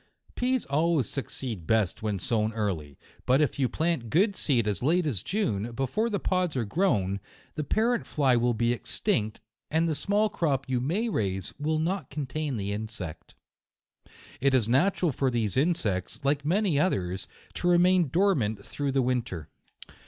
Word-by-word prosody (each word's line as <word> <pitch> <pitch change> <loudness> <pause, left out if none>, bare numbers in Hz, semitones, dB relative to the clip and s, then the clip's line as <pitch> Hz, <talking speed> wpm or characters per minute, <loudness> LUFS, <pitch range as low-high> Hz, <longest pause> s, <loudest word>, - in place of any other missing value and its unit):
Peas 255 -1 0
always 150 -2 +1
succeed 115 - -4
best 110 -5 +1
when 105 -2 -1
sown 110 +3 0
early; 90 -10 -3 0.3
but 130 +2 +5
if 150 -2 +1
you 130 -3 +2
plant 160 -8 -1
good 195 - +3
seed 120 - +1
as 105 - -1
late 165 +6 +2
as 120 - -1
June, 115 - -1
before 135 - 0
the 205 - 0
pods 180 -6 0
are 120 - 0
grown, 100 - +1 0.3
the 155 - -3
parent 230 +9 +1
fly 135 -5 +2
will 120 0 +2
be 120 +1 +2
extinct, 110 - -2 0.3
and 160 +2 +2
the 160 - +1
small 205 +7 +1
crop 145 -9 -1
you 125 -2 0
may 185 - 0
raise 95 - -2
will 155 +2 0
not 180 +5 -1
contain 145 -1 -3
the 100 -1 -3
insect. 105 -6 -6 1.0
It 135 0 +3
is 120 -4 +2
natural 170 +7 +2
for 135 0 0
these 115 -5 -1
insects, 130 - 0
like 140 +1 +2
many 175 -1 +2
others, 95 - 0 0.3
to 175 - -2
remain 180 0 +5
dormant 130 - +1
through 140 -2 -3
the 135 -1 +3
win 125 0 +1
ter. 90 -10 -8
135 Hz, 165 wpm, -28 LUFS, 110-170 Hz, 1.0 s, but